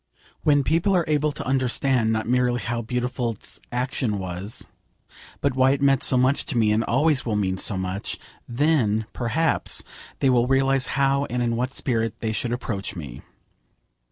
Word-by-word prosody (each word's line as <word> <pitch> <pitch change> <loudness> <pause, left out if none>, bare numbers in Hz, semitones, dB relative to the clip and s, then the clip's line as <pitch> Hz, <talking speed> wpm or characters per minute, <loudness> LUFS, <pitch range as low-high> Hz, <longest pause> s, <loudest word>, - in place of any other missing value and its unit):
When 145 -2 +3
people 170 +7 +2
are 175 -3 +2
able 150 0 +1
to 145 - -7
understand, 130 -2 +1
not 110 0 -1
merely 125 0 +2
how 120 0 -2
beautiful 125 0 -2
's - - -12
action 125 -3 -1
was, 95 +3 -4 0.7
but 140 -2 0
why 130 +1 +4
it 140 - -3
meant 135 -1 +4
so 130 - +3
much 130 +3 +2
to 125 - -2
me, 110 -2 +3
and 110 +2 +2
always 145 +4 +2
will 110 -3 -1
mean 95 -2 0
so 100 - +1
much, 95 +2 -4 0.3
then, 120 -5 +1
perhaps, 155 +7 +1 0.3
they 135 - +2
will 120 -1 +3
realise 135 0 +2
how 140 +1 +2
and 125 -1 -2
in 115 -1 0
what 125 +3 -2
spirit 115 -4 -1
they 110 - -2
should 115 +3 -2
approach 100 -5 -4
me. 70 -8 -8
125 Hz, 175 wpm, -24 LUFS, 110-135 Hz, 0.7 s, why